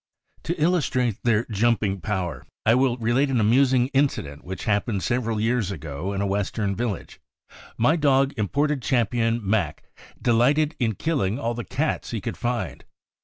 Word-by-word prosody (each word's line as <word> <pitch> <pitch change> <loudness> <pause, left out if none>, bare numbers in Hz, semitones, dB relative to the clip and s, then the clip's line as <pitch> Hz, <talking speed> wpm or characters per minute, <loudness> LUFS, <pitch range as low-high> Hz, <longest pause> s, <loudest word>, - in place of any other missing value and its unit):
To 170 +1 -2
illustrate 145 - +1
their 115 -1 +2
jumping 105 -3 +1
power, 95 -5 -3 0.2
I 110 - +5
will 125 -1 +2
relate 120 +4 +1
an 130 -3 +1
amusing 125 +3 +3
incident 135 - -1
which 95 +1 -6
happened 105 -2 0
several 115 -3 0
years 115 -2 +1
ago 80 0 -5
in 100 0 -2
a - - +1
Western 100 +1 -1
village. 115 -2 -4 0.6
My 145 +9 +3
dog* 140 -2 +3
Imported 140 +7 0
Champion 115 -2 0
Mac 95 -7 0 0.4
delighted 140 +6 +2
in 115 -4 0
killing 125 - 0
all 120 -3 -2
the 120 0 -5
cats 145 +7 -2
he 115 - -3
could 115 +2 -4
find. 120 -6 -3
120 Hz, 155 wpm, -24 LUFS, 105-130 Hz, 0.6 s, I